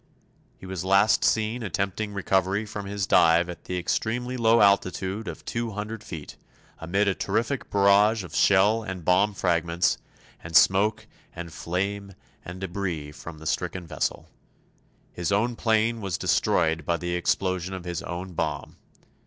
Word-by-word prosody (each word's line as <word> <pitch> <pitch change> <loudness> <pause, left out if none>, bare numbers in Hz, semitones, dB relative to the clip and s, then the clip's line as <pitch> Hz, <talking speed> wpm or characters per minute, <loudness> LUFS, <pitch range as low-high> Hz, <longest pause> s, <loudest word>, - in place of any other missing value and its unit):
He - - -12
was 95 -2 -5
last 100 +3 +4
seen 110 +2 +1
attempting 100 +1 -2
recovery 95 +1 0
from 105 -1 -6
his 100 -1 -2
dive 85 0 +4
at 90 - -9
the 90 - -3
extremely 120 +8 -2
low 115 -1 +4
altitude 100 +1 +2
of - - -7
two 115 -2 -3
hundred 105 +2 -5
feet, 80 -7 -8 0.4
amid 95 +5 0
a 100 - +3
terrific 115 +8 -2
barrage 100 +2 +4
of 90 - -11
shell 100 +3 +4
and 95 -6 -7
bomb 100 +3 +3
fragments, 85 -1 +1 0.4
and 80 0 -7
smoke 105 +6 +4 0.3
and 85 -2 -7
flame 100 +2 -3 0.3
and 90 +2 -9
debris 90 -5 -4
from 80 +2 -10
the 80 - -12
stricken 85 +4 -2
vessel. 80 -3 -3 0.9
His 90 +1 -2
own 115 +4 +1
plane 115 0 +1
was 95 -4 -2
destroyed 80 0 +1
by 85 +3 0
the 90 0 -3
explosion 95 +1 -1
of 95 - -7
his 85 -1 -3
own 90 +1 -6
bomb. - - -3
95 Hz, 155 wpm, -26 LUFS, 85-105 Hz, 0.9 s, last